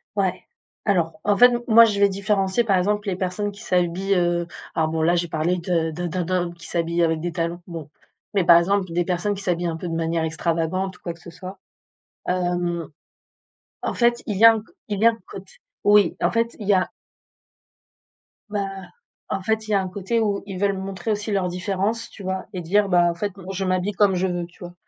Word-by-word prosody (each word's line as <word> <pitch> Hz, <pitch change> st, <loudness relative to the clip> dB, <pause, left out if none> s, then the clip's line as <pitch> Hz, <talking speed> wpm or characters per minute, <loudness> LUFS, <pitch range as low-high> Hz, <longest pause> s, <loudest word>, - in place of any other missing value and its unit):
Ouais. 195 Hz, -3 st, 0 dB, 0.4 s
Alors, 165 Hz, -6 st, +1 dB
en 205 Hz, 0 st, +3 dB
fait, 245 Hz, -, +9 dB
m 240 Hz, 0 st, -1 dB
moi 230 Hz, 0 st, +8 dB
je 210 Hz, -3 st, -1 dB
vais 200 Hz, -, +6 dB
différencier 195 Hz, +2 st, +1 dB
par 200 Hz, -4 st, +2 dB
exemple 205 Hz, +3 st, 0 dB
les 185 Hz, -, -1 dB
personnes 190 Hz, +3 st, -2 dB
qui 200 Hz, +1 st, -13 dB
s'habillent, 180 Hz, +1 st, 0 dB
heu 175 Hz, -1 st, +1 dB, 0.3 s
alors 160 Hz, -1 st, +1 dB
bon 160 Hz, 0 st, -1 dB
là, 170 Hz, +2 st, +3 dB
je 175 Hz, -, +1 dB
vais -, -, -5 dB
parler 160 Hz, +3 st, 0 dB
de 170 Hz, -2 st, 0 dB
de 175 Hz, +3 st, -4 dB
d'un 180 Hz, +2 st, -2 dB
d'un 185 Hz, +2 st, -1 dB
homme, 170 Hz, -1 st, -5 dB
qui 170 Hz, -, -14 dB
s'habille 170 Hz, 0 st, 0 dB
avec 160 Hz, -1 st, +1 dB
des 175 Hz, +2 st, -3 dB
talons, 170 Hz, 0 st, -2 dB
bon, 165 Hz, -4 st, -7 dB, 0.4 s
mais 195 Hz, -3 st, +2 dB
par 170 Hz, -, +8 dB
exemple 195 Hz, +3 st, +2 dB
des 175 Hz, +1 st, +2 dB
personnes 185 Hz, +3 st, 0 dB
qui 200 Hz, -, -8 dB
s'habillent 175 Hz, -1 st, 0 dB
un 165 Hz, -, -2 dB
peu 175 Hz, -, -6 dB
de -, -, -3 dB
manière 165 Hz, 0 st, 0 dB
extravagante 165 Hz, +4 st, -1 dB
ou -, -, -31 dB
quoi 170 Hz, -, -4 dB
que 165 Hz, -, -19 dB
ce 170 Hz, -, -11 dB
soit. 185 Hz, +3 st, -9 dB, 0.7 s
Hem. 175 Hz, -2 st, -1 dB, 1.0 s
En -, -, -1 dB
fait, 240 Hz, 0 st, +2 dB
il 210 Hz, -, -2 dB
y 225 Hz, -, +4 dB
a 230 Hz, -, +11 dB
un 225 Hz, -, -1 dB
c -, -, -17 dB, 0.2 s
il 205 Hz, -2 st, -2 dB
y 225 Hz, -, +5 dB
a -, -, +9 dB
un 230 Hz, -, -8 dB
côte 190 Hz, 0 st, -10 dB, 0.3 s
oui 205 Hz, -3 st, +4 dB
en -, -, +3 dB
fait 230 Hz, 0 st, 0 dB
il 210 Hz, -, -6 dB
y -, -, +5 dB
a 185 Hz, -1 st, +1 dB, 1.6 s
bah, 205 Hz, -2 st, -2 dB, 0.6 s
en 195 Hz, -, -2 dB
fait 220 Hz, +2 st, -1 dB
il -, -, -4 dB
y -, -, +2 dB
a 200 Hz, -, +3 dB
un 190 Hz, -, -4 dB
côté 200 Hz, +5 st, -1 dB
où 205 Hz, -2 st, 0 dB
ils 195 Hz, -2 st, -6 dB
veulent 200 Hz, 0 st, +1 dB
montrer 195 Hz, +3 st, -4 dB
aussi 210 Hz, +1 st, -2 dB
leurs 195 Hz, -2 st, +1 dB
différences, 195 Hz, +5 st, -2 dB
tu 200 Hz, -, -12 dB
vois? 190 Hz, 0 st, -3 dB
Et 180 Hz, -, -4 dB
dire: 200 Hz, +5 st, +2 dB
«Bah, 175 Hz, -1 st, +5 dB
en -, -, -7 dB
fait, 200 Hz, +2 st, -3 dB
non, 190 Hz, 0 st, -8 dB
je 195 Hz, 0 st, -2 dB
m'habille 185 Hz, +2 st, 0 dB
comme 195 Hz, 0 st, +3 dB
je 185 Hz, +1 st, +1 dB
veux», 175 Hz, -1 st, -2 dB
tu 175 Hz, -, -23 dB
vois? 175 Hz, 0 st, -8 dB
185 Hz, 240 wpm, -23 LUFS, 175-200 Hz, 1.6 s, a